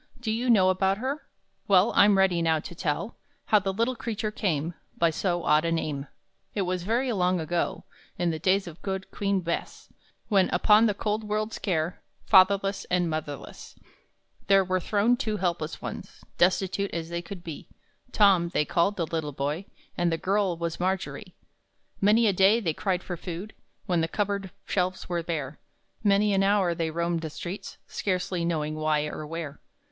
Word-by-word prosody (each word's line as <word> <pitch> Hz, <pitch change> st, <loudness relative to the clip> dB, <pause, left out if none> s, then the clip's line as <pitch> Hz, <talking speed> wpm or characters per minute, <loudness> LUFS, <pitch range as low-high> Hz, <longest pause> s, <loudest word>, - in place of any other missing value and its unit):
Do 235 Hz, -3 st, -2 dB
you 240 Hz, +3 st, -1 dB
know 190 Hz, -5 st, +6 dB
about 190 Hz, +1 st, +1 dB
her? 270 Hz, +6 st, -4 dB, 0.4 s
Well, 195 Hz, +2 st, +5 dB
I'm 200 Hz, -1 st, +6 dB
ready 190 Hz, -3 st, +3 dB
now 160 Hz, -1 st, +2 dB
to 165 Hz, -, -8 dB
tell 165 Hz, +6 st, -3 dB, 0.3 s
How 210 Hz, -, +5 dB
the 195 Hz, 0 st, -2 dB
little 230 Hz, +6 st, 0 dB
creature 220 Hz, -2 st, -3 dB
came 170 Hz, -6 st, -1 dB, 0.2 s
By 170 Hz, -1 st, +3 dB
so 175 Hz, +1 st, -1 dB
odd 150 Hz, +1 st, +4 dB
a 165 Hz, -, 0 dB
name. 150 Hz, -4 st, -2 dB, 0.5 s
It 200 Hz, -, +1 dB
was 180 Hz, 0 st, -2 dB
very 235 Hz, +7 st, 0 dB
long 180 Hz, -3 st, +1 dB
ago, 165 Hz, +2 st, -2 dB, 0.3 s
In 175 Hz, -1 st, +1 dB
the 160 Hz, -, -4 dB
days 190 Hz, +4 st, +2 dB
of 170 Hz, -1 st, -10 dB
good 190 Hz, -1 st, -4 dB
Queen 200 Hz, -2 st, 0 dB
Bess, 170 Hz, -1 st, -4 dB, 0.4 s
When 195 Hz, -3 st, +3 dB
upon 215 Hz, +1 st, +5 dB
the 205 Hz, -, 0 dB
cold 215 Hz, +1 st, -1 dB
world's 215 Hz, +1 st, -2 dB
care, 170 Hz, -3 st, -1 dB, 0.2 s
Fatherless 195 Hz, 0 st, +4 dB
and 175 Hz, -2 st, +1 dB
motherless, 150 Hz, -3 st, -6 dB, 0.7 s
There 195 Hz, 0 st, +5 dB
were 185 Hz, 0 st, 0 dB
thrown 215 Hz, +6 st, +2 dB
two 215 Hz, -3 st, -2 dB
helpless 170 Hz, -4 st, -2 dB
ones, -, -, -7 dB, 0.2 s
Destitute 190 Hz, +2 st, +2 dB
as 165 Hz, -1 st, -3 dB
they 170 Hz, 0 st, -3 dB
could 175 Hz, 0 st, -9 dB
be; 160 Hz, -4 st, -8 dB, 0.4 s
Tom, 195 Hz, -6 st, +4 dB
they 150 Hz, -, +1 dB
called 195 Hz, +6 st, +1 dB
the 170 Hz, -, 0 dB
little 160 Hz, -2 st, -3 dB
boy, 145 Hz, +7 st, -2 dB, 0.3 s
And 175 Hz, -1 st, +1 dB
the 165 Hz, -, 0 dB
girl 190 Hz, -1 st, 0 dB
was 170 Hz, 0 st, -3 dB
Margery. 190 Hz, +1 st, -3 dB, 0.7 s
Many 215 Hz, +4 st, +5 dB
a 205 Hz, -, +4 dB
day 195 Hz, +5 st, +5 dB
they 170 Hz, -8 st, -1 dB
cried 185 Hz, +1 st, -1 dB
for 175 Hz, -, -5 dB
food 180 Hz, +5 st, -6 dB, 0.3 s
When 175 Hz, -4 st, +1 dB
the 165 Hz, -, +1 dB
cup 205 Hz, +5 st, 0 dB
board 200 Hz, -1 st, -3 dB, 0.2 s
shelves 185 Hz, -1 st, -1 dB
were 175 Hz, -1 st, -1 dB
bare; 155 Hz, -4 st, -4 dB, 0.4 s
Many 205 Hz, 0 st, +3 dB
an 195 Hz, -, +3 dB
hour 195 Hz, -3 st, +3 dB
they 165 Hz, -1 st, -2 dB
roamed 170 Hz, +1 st, -1 dB
the 160 Hz, -, -4 dB
streets 175 Hz, +6 st, -7 dB
Scarcely 180 Hz, -2 st, -2 dB
knowing 155 Hz, -3 st, -1 dB
why 155 Hz, -1 st, 0 dB
or 150 Hz, 0 st, -6 dB
where. 160 Hz, -2 st, -6 dB
185 Hz, 180 wpm, -27 LUFS, 165-200 Hz, 0.7 s, know